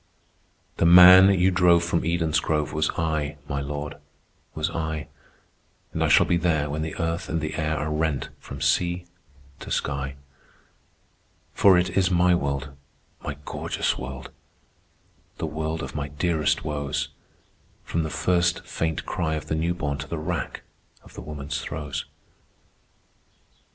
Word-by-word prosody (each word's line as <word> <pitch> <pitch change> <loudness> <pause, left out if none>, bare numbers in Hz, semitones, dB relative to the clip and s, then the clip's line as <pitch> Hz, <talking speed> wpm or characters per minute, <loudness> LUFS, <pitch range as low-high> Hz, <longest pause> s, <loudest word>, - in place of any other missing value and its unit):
"The - - +2
man 90 +2 +10
you 95 -1 +3
drove 85 -1 +4
from 85 0 0
Eden's 80 -2 +1
grove 75 0 -1
Was 75 +1 +1
I, 80 -2 -1
my 70 0 -2
Lord, 75 +1 -5 0.6
was 80 +1 -1
I, 80 -2 -3 0.9
And - - 0
I - - +3
shall - - +6
be 85 - +2
there 80 -4 0
when 75 +2 -2
the 80 0 -4
earth 85 0 -2
and 80 - 0
the 75 0 -3
air 80 -1 -1
Are 75 +1 -2
rent 80 -2 -1
from 70 0 -9
sea 85 +3 +1 0.5
to - - -9
sky; 70 -1 -2 1.4
For 95 -3 +6
it 90 +1 +1
is 95 0 +2
my 90 0 +4
world, 70 -4 -1 0.5
my 70 - -5
gorgeous - - -2
world, 65 0 -7 1.1
The - - -3
world 80 +1 -3
of - - -6
my 75 -1 -3
dearest 75 +1 0
woes, 70 -2 -2 0.7
From 85 - -2
the 80 - -2
first 85 +2 +1
faint 80 -1 -2
cry 80 -2 -1
of 75 - -6
the 80 - 0
newborn 80 -3 -1
To 70 - -6
the 85 - -4
rack 75 - -4 0.4
of - - -17
the - - -8
woman's 75 -1 -5
throes. 75 -1 -5
80 Hz, 150 wpm, -25 LUFS, 75-85 Hz, 1.4 s, man